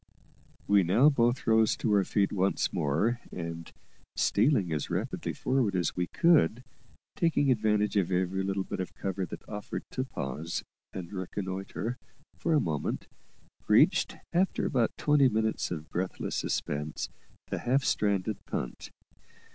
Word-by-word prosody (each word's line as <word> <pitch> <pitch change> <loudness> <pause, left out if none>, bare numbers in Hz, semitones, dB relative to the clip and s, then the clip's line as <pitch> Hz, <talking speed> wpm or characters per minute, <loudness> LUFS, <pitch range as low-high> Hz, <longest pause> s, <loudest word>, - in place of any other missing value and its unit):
We 100 0 +5
now 105 - +5
both 120 -2 +1
rose 110 -1 +4
to 110 - 0
our 100 -1 +4
feet 100 +1 +1
once 95 0 0
more, 85 - +1
and, 85 -1 -6 0.4
stealing 105 - +2
as 75 - -2
rapidly - - -2
forward 130 -7 0
as 90 -3 0
we 90 -1 -1
could, 145 - +3 0.5
taking 165 -6 +2
advantage 105 -3 +2
of 95 -4 +2
every 95 +1 0
little 95 0 -1
bit - - -5
of 95 - -4
cover 95 -1 -3
that - - -9
offered 105 -1 -5
to 130 - -1
pause 80 - -4 0.3
and 90 0 -7
reconnoitre 95 +4 -4 0.4
for 165 - 0
a - - +5
moment, 80 - -2 0.6
reached, - - +4 0.2
after 185 +3 +1
about 120 -6 +1
twenty 145 -3 +4
minutes 110 -1 0
of 80 -3 -5
breathless 90 +1 -3
suspense, 75 +1 -2 0.4
the - - -1
half 130 +3 +1
stranded 100 -3 0
punt. 60 - -4
100 Hz, 140 wpm, -29 LUFS, 90-120 Hz, 0.6 s, We